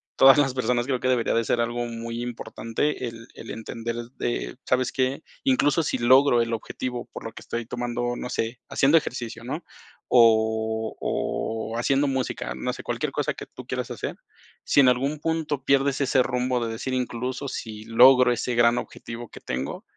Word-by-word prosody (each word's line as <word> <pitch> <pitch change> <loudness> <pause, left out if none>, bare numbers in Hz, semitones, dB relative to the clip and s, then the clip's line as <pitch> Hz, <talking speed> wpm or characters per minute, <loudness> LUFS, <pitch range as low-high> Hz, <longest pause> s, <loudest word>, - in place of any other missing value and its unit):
todas 135 +2 +8
las 135 -3 +3
personas 125 -2 0
creo 130 -2 -1
que 130 - -1
debería 125 -2 +2
de 115 - +2
ser 120 - 0
algo 120 +1 -1
muy 115 0 -5
importante 120 +2 -3
el 115 0 -9
el 115 - -11
entender 115 +1 -5 0.2
de, 120 +1 -3
¿sabes 130 0 +1
qué? 130 +3 -1 0.2
Incluso 255 - +3
sí - - -1
logro 130 +1 +5
el 115 0 -1
objetivo 120 +2 -4
por - - -7
lo 115 - -5
que - - -10
estoy 120 0 -4
tomando, 120 0 -2
no 125 - -5
sé, 115 +1 -2
haciendo 140 +4 +3
ejercicio, 120 -6 -3
¿no? 145 +8 -4 0.4
O 110 -1 +3
o 110 0 -2
haciendo 140 +4 +2
música, 130 - -2
no 65 - -2
sé, - - -8
cualquier - - -2
cosa - - -1
que - - -8
tú - - -11
quieras - - -3
hacer, - - -5 0.5
sí - - +3
en 130 - +5
algún 135 +4 0
punto 155 -3 -2
pierdes 140 0 +3
ese 135 -1 +3
rumbo 125 0 0
de 115 - -3
decir: 120 +4 -4
"Incluso 125 +2 -2
si 110 -4 -6
logro 125 +2 +7
ese 120 +1 -1
gran 120 0 +4
objetivo 115 -1 -8
que - - -11
tengo, 65 +2 -4
120 Hz, 185 wpm, -25 LUFS, 115-130 Hz, 0.5 s, todas